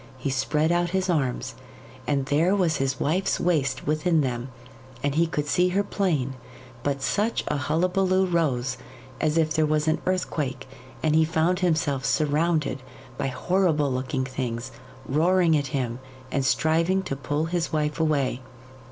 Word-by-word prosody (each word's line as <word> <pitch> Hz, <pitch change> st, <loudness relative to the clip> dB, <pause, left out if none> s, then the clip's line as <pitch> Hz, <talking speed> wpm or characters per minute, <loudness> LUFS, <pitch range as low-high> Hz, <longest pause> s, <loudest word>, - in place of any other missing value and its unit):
He 135 Hz, +1 st, -2 dB
spread 150 Hz, +5 st, +1 dB
out 175 Hz, 0 st, +1 dB
his 190 Hz, -1 st, 0 dB
arms, 130 Hz, -5 st, -1 dB, 0.5 s
and 140 Hz, -1 st, +1 dB
there 160 Hz, +8 st, +2 dB
was 175 Hz, -5 st, +1 dB
his 135 Hz, 0 st, -1 dB
wife's 185 Hz, +6 st, 0 dB
waist 140 Hz, -7 st, 0 dB
within 155 Hz, +2 st, +2 dB
them, 125 Hz, -1 st, -2 dB, 0.5 s
and 145 Hz, -1 st, +1 dB
he 165 Hz, +3 st, +2 dB
could 150 Hz, -2 st, -2 dB
see 180 Hz, +5 st, +2 dB
her 195 Hz, +3 st, +1 dB
plain; 160 Hz, -11 st, -1 dB, 0.5 s
but 140 Hz, 0 st, -2 dB
such 215 Hz, +9 st, 0 dB
a -, -, 0 dB
hullabulloo 185 Hz, +7 st, +1 dB
rose 135 Hz, -8 st, 0 dB, 0.4 s
as 155 Hz, +1 st, +1 dB
if 155 Hz, -1 st, +2 dB
there 155 Hz, -1 st, +2 dB
was 150 Hz, 0 st, +1 dB
an 155 Hz, -, +1 dB
earthquake, 150 Hz, -8 st, -2 dB, 0.4 s
and 155 Hz, -1 st, +2 dB
he 160 Hz, -, +5 dB
found 165 Hz, +3 st, +1 dB
himself 155 Hz, -7 st, +1 dB
surrounded 155 Hz, -1 st, +1 dB, 0.4 s
by 140 Hz, -, 0 dB
horrible 155 Hz, +1 st, +1 dB
looking 130 Hz, +1 st, -2 dB
things, 130 Hz, -1 st, -4 dB, 0.4 s
roaring 170 Hz, +3 st, +3 dB
at 145 Hz, -2 st, 0 dB
him 125 Hz, -3 st, -2 dB, 0.3 s
and 135 Hz, -1 st, 0 dB
striving 165 Hz, +7 st, +2 dB
to 140 Hz, -, -3 dB
pull 145 Hz, +3 st, -2 dB
his 170 Hz, 0 st, -2 dB
wife 150 Hz, 0 st, -1 dB
away. 140 Hz, -5 st, +1 dB
155 Hz, 155 wpm, -25 LUFS, 135-170 Hz, 0.5 s, he